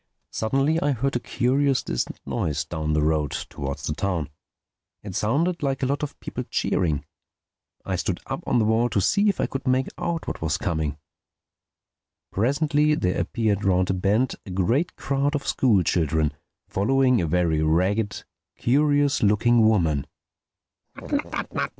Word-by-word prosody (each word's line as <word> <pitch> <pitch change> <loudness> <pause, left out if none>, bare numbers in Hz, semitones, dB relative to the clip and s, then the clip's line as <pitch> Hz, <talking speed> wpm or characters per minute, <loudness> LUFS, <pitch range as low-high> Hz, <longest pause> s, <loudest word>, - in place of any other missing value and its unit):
Suddenly 135 +8 +1
I 145 0 +2
heard 135 +2 -1
a - - +2
curious 135 +3 +1
distant - - -3
noise 75 -1 -2
down 75 -1 -2
the 75 -1 +2
road, 75 -1 +1
towards 70 -1 -5
the 75 - -1
town. 85 -4 -2 0.7
It - - -7
sounded 165 +11 0
like 135 -2 -1
a - - +3
lot 140 +2 -1
of 150 - -5
people - - -5
cheering. 80 -5 0 0.8
I - - -1
stood - - -2
up - - -4
on - - +2
the 110 - +3
wall 115 +2 +2
to 100 - +1
see 205 - +3
if 200 - -1
I - - +2
could 135 -2 -5
make 130 +1 +2
out 170 -2 -2
what - - -4
was 80 -3 0
coming. 80 -3 -2 1.3
Presently 145 +6 +2
there 90 -9 0
appeared 110 -4 -1
round 95 -1 +2
a - - +1
bend 105 +7 +1
a - - -11
great 115 - 0
crowd 140 +2 0
of 145 - -3
school 110 -8 +3
children 80 -2 +1 0.3
following 125 +3 +2
a 85 - -1
very 80 -1 +1
ragged, 95 +7 +1 0.3
curious 145 +2 +2
looking 110 +2 +4
woman. 80 -10 +2
110 Hz, 155 wpm, -24 LUFS, 85-135 Hz, 1.3 s, looking